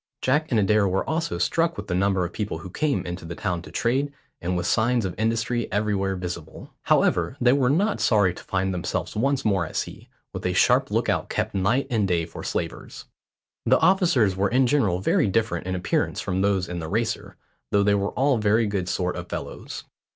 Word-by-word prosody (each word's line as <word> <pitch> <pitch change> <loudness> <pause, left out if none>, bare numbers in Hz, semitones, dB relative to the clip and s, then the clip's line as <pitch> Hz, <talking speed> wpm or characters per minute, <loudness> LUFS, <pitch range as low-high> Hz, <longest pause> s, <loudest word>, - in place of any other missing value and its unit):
Jack 150 +5 +2
and 115 - +2
Adair 105 0 +3
were 95 +1 -1
also 160 +1 -1
struck 165 0 +1
with - - -5
the 90 - -3
number 95 0 +1
of 85 - -7
people 105 -6 -3
who 85 +3 -9
came 140 -7 0
into 90 +1 -5
the 85 +1 -6
town 90 -1 -2
to - - -12
trade, 135 +5 0 0.3
and 90 +1 -1
with 85 - -2
the - - +1
signs 120 0 +2
of 90 - -3
industry 115 +2 -1
everywhere 100 -2 0
visible. 85 -3 -7
However, 130 - +2
they 125 0 +4
were 135 -3 +2
not 200 +9 +1
sorry 100 -6 +3
to - - -11
find 95 0 -1
themselves 90 - -3
once 135 +4 0
more 100 -4 +2
at 80 - -7
sea, - - -5 0.2
with - - -6
a - - 0
sharp - - +3
lookout - - 0
kept - - -2
night 110 +8 +1
and 110 -4 +2
day 85 -3 +1
for 85 - -9
slavers. - - -4 0.6
The 130 +3 +5
officers 160 - +3
were 95 +1 +1
in 130 +2 +3
general 110 -10 +1
very 100 - +2
different 95 -4 0
in 95 - -1
appearance 90 - -1
from 95 +1 -1
those 100 -2 +1
in 90 -1 -4
the 80 -1 -5
Racer, 115 +4 -2 0.4
though 100 0 +3
they 100 0 +3
were 100 0 +1
all 135 -2 +2
very 110 +2 +3
good 100 -3 -2
sort 90 -1 -1
of 85 0 -7
fellows. - - -6
100 Hz, 210 wpm, -24 LUFS, 90-125 Hz, 0.6 s, The